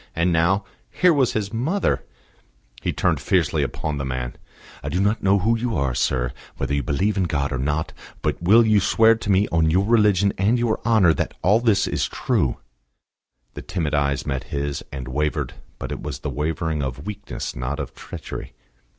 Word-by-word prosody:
And 85 +1 +2
now, 90 +5 +2 0.2
here 180 -2 +4
was 135 -5 +2
his 105 -1 -2
mother 155 - 0 0.8
He - - -1
turned - - +1
fiercely - - +1
upon 75 -2 -3
the - - -2
man. 65 -2 -3 0.5
"I - - -4
do 90 - -1
not 105 +3 +1
know 100 +1 +4
what 110 +4 +1
you 120 -6 -1
are, 70 -3 0
sir 60 0 0 0.2
whether - - -2
you 70 - +1
believe 100 +11 0
in 95 - +2
God 70 -4 -1
or 65 - -2
not; 75 +4 -1 0.3
but - - -1
will 110 +7 +6
you 110 -1 +4
swear 110 +4 +5
to 115 -2 -5
me 100 +1 +4
on 80 -1 +2
your 95 +5 +2
religion 105 -3 +3
and 105 +6 +3
your 120 -2 0
honour 105 -8 +5
that - - -3
all 105 +6 +5
this 115 -4 +3
is - - -1
true?" 60 - 0 1.0
The - - -7
timid 85 -5 -3
eyes 70 -1 +1
met 65 -2 -2
his, 70 0 -3
and 65 -2 -6
wavered; 75 +3 -1 0.2
but - - -6
it - - -4
was 75 -5 -5
the - - -3
wavering 80 +1 -2
of 70 +2 -4
weakness, 105 -2 -5
not 60 +4 -3
of - - -5
treachery. - - -8
85 Hz, 195 wpm, -23 LUFS, 70-105 Hz, 1.0 s, will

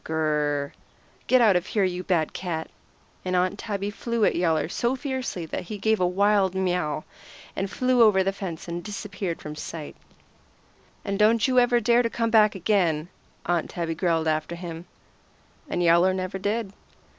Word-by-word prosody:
Gr 160 - -6
r - - 0
r 155 - +1 0.4
r! 140 - -10 0.5
Get 255 -1 +5
out 215 -5 +5
of 180 0 0
here, 205 - +1
you 180 -1 -1
bad 170 -4 0
cat!" 165 -3 -4 0.5
And 185 0 -1
Aunt 185 +3 +1
Tabby 205 -1 -3
flew 230 +1 -1
at - - +3
Yowler 165 -3 +1
so 235 +8 -1
fiercely 260 - -4
that 160 - -5
he 210 +4 -6
gave 220 +2 +1
a 180 - +3
wild 195 0 +2
miaw, 180 -5 -1 0.5
and 195 0 -2
flew 255 +4 +2
over 205 -4 +5
the 195 +1 0
fence 180 -5 -6
and 170 0 -4
disappeared 200 -4 -5
from 150 0 -7
sight. 155 -1 -7 1.1
"And 200 -1 -2
don't 220 +2 +4
you 255 -1 +4
ever 245 0 +4
dare 235 +1 +4
to 230 - 0
come 230 -1 -1
back 215 -2 +5
again," 175 -5 +1 0.4
Aunt 175 -2 0
Tabby 165 -2 -3
growled 165 -1 0
after 155 +2 -1
him. 170 0 -8 0.8
And 175 - -1
Yowler 175 +2 +4
never 185 +1 -4
did. 205 +1 -2
190 Hz, 180 wpm, -25 LUFS, 170-215 Hz, 1.1 s, Get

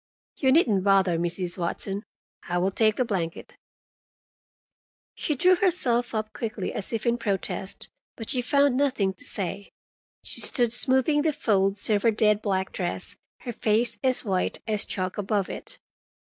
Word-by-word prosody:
You 265 -2 +2
needn't 230 - +3
bother, 190 -4 +3
Mrs. 175 +1 -2
Watson. 195 +3 -3 0.5
I 175 - 0
will 185 +2 +1
take 215 +1 +2
the 255 - 0
blanket." 175 -7 -4 1.6
She 300 - -2
drew 365 +7 +4
herself 245 - +1
up 215 0 -3
quickly, 215 -4 -4
as 200 - -3
if 225 -2 -3
in 235 0 +1
protest, 195 -3 -3 0.3
but 225 +1 -5
she 255 -3 +1
found 280 +1 +2
nothing 255 -9 +1
to 190 - -11
say. 200 +1 -3 0.5
She - - -1
stood 240 -3 +2
smoothing 265 +4 +3
the 315 +1 +2
folds 200 -6 +1
of 205 -1 +3
her 230 - +4
dead 210 -1 +2
black 190 -2 -1
dress, 175 -2 -2 0.3
her 240 - -5
face 220 0 0
as 255 -2 +2
white 190 -3 0
as 210 -2 +1
chalk 185 +1 -3
above 205 -1 -1
it. - - -7
215 Hz, 160 wpm, -26 LUFS, 195-245 Hz, 1.6 s, drew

